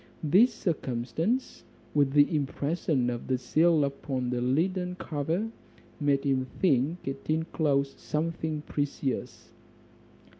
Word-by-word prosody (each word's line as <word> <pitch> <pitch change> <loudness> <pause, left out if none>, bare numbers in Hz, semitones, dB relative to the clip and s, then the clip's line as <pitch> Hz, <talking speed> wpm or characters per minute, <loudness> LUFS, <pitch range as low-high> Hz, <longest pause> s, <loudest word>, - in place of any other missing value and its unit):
This 195 - +5
circumstance, 160 - -2 0.3
with 140 -2 +3
the 145 +2 +5
impression 145 -2 0
of 120 - -5
the 130 0 +1
seal 155 +5 +3
upon 135 -2 -2
the 125 -1 -1
leaden 180 +8 0
cover, 165 +5 -2 0.5
made 145 -2 +2
him 135 -2 +1
think 155 0 +1
it 135 +2 -5
inclosed 155 -3 0
something 155 -1 -2
precious. 145 -3 -3
145 Hz, 110 wpm, -28 LUFS, 135-165 Hz, 0.5 s, This